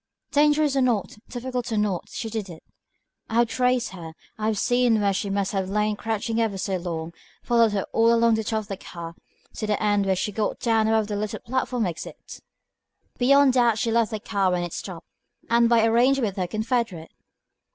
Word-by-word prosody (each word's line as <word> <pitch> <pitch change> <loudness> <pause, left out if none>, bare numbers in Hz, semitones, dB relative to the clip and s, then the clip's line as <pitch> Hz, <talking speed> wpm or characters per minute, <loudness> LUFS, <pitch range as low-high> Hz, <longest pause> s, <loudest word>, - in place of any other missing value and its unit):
"Dangerous 295 0 +3
or 270 - +3
not, 230 -4 0
difficult 250 -1 -4
or 220 - 0
not, 205 -4 -1
she 230 - -5
did 215 -3 -4
it. 165 -2 -11 0.7
I 225 - -4
have 235 0 +4
traced 250 +1 +1
her; 165 -4 -9 0.2
have 215 0 -1
seen 245 0 +2
where 200 -1 +2
she 200 +1 -2
must 195 -1 -1
have 190 -2 -2
lain 210 +1 0
crouching 225 +1 -2
ever 215 -4 -1
so 190 0 -2
long, 170 -2 -5 0.3
followed 230 -3 +3
her 195 -2 0
all 230 +1 +4
along 230 0 +4
the 220 0 0
top 220 0 -1
of 210 - -14
the 195 -2 -5
car, 170 -3 -8 0.4
to 215 - -4
the 210 -1 0
end 205 -2 +1
where 190 - +2
she 190 +3 -2
got 210 +1 -2
down 225 -2 +2
above 220 -1 +2
the 205 0 -4
little 210 0 -3
platform 250 -1 -1
exit. 170 -3 -7 0.8
Beyond 275 +1 +5
doubt 240 -3 +3
she 225 +1 0
left 230 -1 +2
the 215 -2 -4
car 200 -3 0
when 180 -1 0
it 175 - -5
stopped, 175 -4 -7 0.5
and 235 0 +4
by 230 -2 +4
arrangement 240 +1 +3
with 195 - -12
her 185 -2 -1
confederate." 215 -5 -2
220 Hz, 205 wpm, -24 LUFS, 195-235 Hz, 0.8 s, Beyond